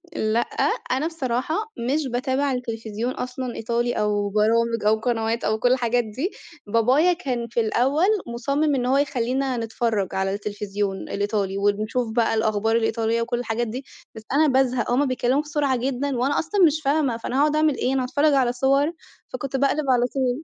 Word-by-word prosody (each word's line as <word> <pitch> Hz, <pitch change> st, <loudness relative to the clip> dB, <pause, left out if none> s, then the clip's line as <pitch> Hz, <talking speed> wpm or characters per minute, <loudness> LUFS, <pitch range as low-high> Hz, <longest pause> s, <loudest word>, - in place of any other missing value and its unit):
لأ، 220 Hz, +1 st, +1 dB, 0.5 s
أنا 265 Hz, +5 st, +1 dB
بصراحة 270 Hz, -2 st, -2 dB, 0.4 s
مش 295 Hz, 0 st, 0 dB
باتابع 260 Hz, +3 st, 0 dB
التلفزيون 230 Hz, -2 st, -3 dB
أصلًا، 250 Hz, 0 st, -5 dB
إيطالي 235 Hz, +1 st, -1 dB
أو 205 Hz, -1 st, 0 dB
برامج 230 Hz, +2 st, +1 dB
أو 215 Hz, -, +5 dB
قنوات 225 Hz, 0 st, -1 dB
أو 220 Hz, 0 st, 0 dB
كل 245 Hz, +2 st, +3 dB
الحاجات 245 Hz, -1 st, +2 dB
دي، 255 Hz, -, -4 dB, 0.4 s
بابايا 255 Hz, -, +3 dB
كان 255 Hz, -9 st, -3 dB
في 235 Hz, -, -2 dB
الأول 260 Hz, +8 st, +2 dB, 0.3 s
مُصمِّم 280 Hz, +5 st, 0 dB
إن 250 Hz, -2 st, -1 dB
هو 260 Hz, +2 st, +3 dB
يخلّينا 265 Hz, -1 st, 0 dB
نتفرّج 225 Hz, -3 st, -1 dB
على 190 Hz, 0 st, 0 dB
التلفزيون 205 Hz, -1 st, -3 dB
الإيطالي 200 Hz, -1 st, -1 dB
ونشوف 215 Hz, +4 st, 0 dB
بقى 230 Hz, -2 st, +2 dB
الأخبار 220 Hz, 0 st, +1 dB
الإيطالية 225 Hz, 0 st, +1 dB
وكل 240 Hz, +1 st, -2 dB
الحاجات 240 Hz, 0 st, -2 dB
دي، 255 Hz, +5 st, -6 dB, 0.3 s
بس 220 Hz, -, -9 dB
أنا 305 Hz, +2 st, +4 dB
بازهَق، 255 Hz, -3 st, +1 dB
هُم 265 Hz, +4 st, +3 dB
بيتكلّموا 255 Hz, +2 st, +1 dB
بسرعة 295 Hz, -3 st, 0 dB
جدًا 265 Hz, +2 st, -2 dB
وأنا 265 Hz, +4 st, +1 dB
أصلًا 380 Hz, +5 st, -1 dB
مش 310 Hz, 0 st, +2 dB
فاهمة، 280 Hz, -4 st, +1 dB
فأنا 240 Hz, +3 st, -3 dB
هأقعُد 300 Hz, +1 st, +3 dB
أعمل 305 Hz, -2 st, +2 dB
إيه، 255 Hz, -, 0 dB
أنا 265 Hz, -1 st, +1 dB
هاتفرّج 285 Hz, +4 st, +2 dB
على 260 Hz, -3 st, +3 dB
صوَر 275 Hz, +4 st, +2 dB, 0.4 s
فكنت 270 Hz, +1 st, -4 dB
باقلِب 280 Hz, +2 st, +1 dB
على 245 Hz, -1 st, +4 dB
طول. 260 Hz, +2 st, -1 dB
245 Hz, 170 wpm, -23 LUFS, 225-275 Hz, 0.5 s, أو